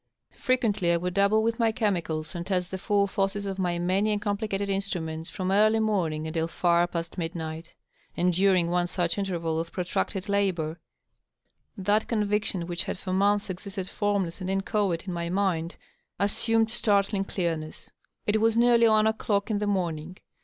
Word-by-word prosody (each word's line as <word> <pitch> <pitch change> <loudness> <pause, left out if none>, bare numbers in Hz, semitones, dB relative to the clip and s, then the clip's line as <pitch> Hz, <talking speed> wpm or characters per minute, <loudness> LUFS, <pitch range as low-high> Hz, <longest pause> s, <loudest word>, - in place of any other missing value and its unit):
Frequently 215 -8 +1
I 170 - +3
would 180 +1 -3
dab 200 +1 +4
ble 220 +1 +3
with 230 +1 0
my 225 -1 +3
chemicals, 175 -9 -1
and 170 -1 -4
test 180 -1 -2
the 190 - -4
full 200 0 +2
forces 200 +1 -1
of 195 -1 -4
my 175 -2 0
many 190 +5 +1
and 210 - 0
compli 205 +1 -2
cated 200 0 -2
instruments, 175 -5 -3
from 185 0 -3
early 215 +2 +4
morning 175 -8 0
until 160 +1 -1
fer 170 0 +2
past 170 +1 -5
midnight. 165 -1 -5 0.4
And 180 +1 +2
during 185 -2 +3
one 175 0 +1
such 175 +1 -1
interval 170 -5 -1
of 165 0 -4
protracted 185 +2 -2
labor 180 -6 0 1.0
that 205 +3 +1
conviction 210 -4 0
which 175 +1 -3
had - - -3
for 185 0 -4
months 200 +1 +2
existed 190 0 -6
formless 200 -4 -1
and 185 - -3
inchoate 195 -2 0
in 185 - -3
my 170 0 -3
mind 180 -3 0 0.4
assumed 225 +2 +1
startling 200 -3 +2
clearness. 165 -5 -4 0.3
It 215 +1 +1
was 225 0 +3
nearly 235 -1 +5
one 215 -1 +4
o^clock 220 -1 0
in 205 - +1
the 210 - -1
morning. 180 -3 -2
195 Hz, 175 wpm, -27 LUFS, 175-205 Hz, 1.0 s, nearly